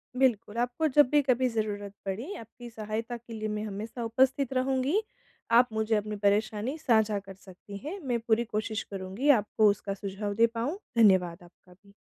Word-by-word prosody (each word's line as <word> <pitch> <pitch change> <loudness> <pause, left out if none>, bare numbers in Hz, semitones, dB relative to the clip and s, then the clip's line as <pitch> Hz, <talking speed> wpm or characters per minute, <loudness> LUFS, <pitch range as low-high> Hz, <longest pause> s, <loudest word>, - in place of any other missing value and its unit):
बिल्कुल, 240 -4 +1
आपको 245 +6 0
जब 295 -2 +5
भी 295 +1 +4
कभी 255 -2 +2
ज़रूरत 205 -3 -3
पड़ी, 225 - -4
आपकी 235 +2 -10
सहायता 225 +2 -4
के 235 0 -12
लिए 215 -1 -3
मैं 210 0 -3
हमेशा 215 +3 -5
उपस्थित 265 +3 +1
रहूँगी। 265 +8 +1 0.6
आप 245 +1 +6
मुझे 220 0 +1
अपनी 210 0 -2
परेशानी 215 +6 +1
साझा 220 -8 +2
कर 195 -1 -11
सकती 195 +1 -12
हैं, 365 +7 -5
मैं 250 -8 -1
पूरी 230 +1 +1
कोशिश 215 0 -3
करूँगी, 195 +8 -2
आपको 210 +1 +3
उसका 200 0 -2
सुझाव 200 +1 -4
दे 230 +2 +5
पाऊँ। 235 +9 -3 0.2
धन्यवाद 185 -6 +4
आपका 175 +1 -20
भी। 200 +2 -23
220 Hz, 175 wpm, -28 LUFS, 205-250 Hz, 0.6 s, आप